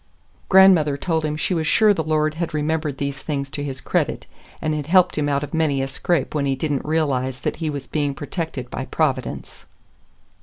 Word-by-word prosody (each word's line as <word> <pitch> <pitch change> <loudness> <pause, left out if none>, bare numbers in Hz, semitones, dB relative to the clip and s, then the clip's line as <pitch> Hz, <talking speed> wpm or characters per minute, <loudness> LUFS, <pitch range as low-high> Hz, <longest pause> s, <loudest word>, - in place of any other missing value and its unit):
Grandmother 185 -7 +6
told 160 0 -1
him 150 -1 -1
she 170 - -1
was 160 -2 -1
sure 215 +5 +5
the 165 - -1
Lord 155 0 +1
had 165 0 -3
remembered 155 -1 -1
these 140 -1 -3
things 140 -3 -3
to 145 - -4
his 135 -2 -4
credit, - - -1 0.3
and 155 - -1
had 150 -1 -3
helped 180 +1 +4
him 145 -1 0
out 140 0 0
of 145 - -7
many 155 -4 +1
a 135 - -1
scrape 140 +2 -1
when 145 -2 0
he 135 - +1
did 150 +3 -2
n't 135 - -2
realize 135 -5 -1
that - - -2
he 160 -2 -2
was 145 -2 -5
being 145 -2 -1
protected 145 -5 -5
by 135 - -4
Providence. 135 -5 -2
150 Hz, 205 wpm, -22 LUFS, 140-160 Hz, 0.3 s, Grandmother